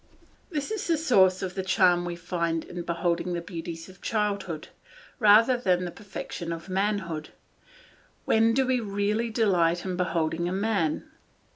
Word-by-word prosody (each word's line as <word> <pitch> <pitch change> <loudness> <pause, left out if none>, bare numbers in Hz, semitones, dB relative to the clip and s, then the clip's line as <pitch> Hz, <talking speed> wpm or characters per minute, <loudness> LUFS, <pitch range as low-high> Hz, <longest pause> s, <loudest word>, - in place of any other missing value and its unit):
This 300 0 -3
is 435 -3 -3
the 335 -2 +2
source 190 - +4
of 185 -1 -3
the 190 - -2
charm 185 -2 +3
we 175 0 -3
find 170 -1 -2
in 175 0 -6
beholding 170 +1 -1
the 170 - -1
beauties 165 -2 -7
of 185 -1 -16
childhood, 200 -7 -2 0.5
rather 225 +3 +6
than 180 -7 +1
the 175 - -4
perfection 190 -4 -7
of 165 +2 -6
manhood. 185 -5 -1 1.0
When 225 +1 +3
do 265 0 +3
we 255 -1 +1
really 210 +2 -1
delight 180 -7 +2
in 185 -1 -2
beholding 170 -1 0
a - - -3
man? 195 -5 0
185 Hz, 155 wpm, -27 LUFS, 170-215 Hz, 1.0 s, rather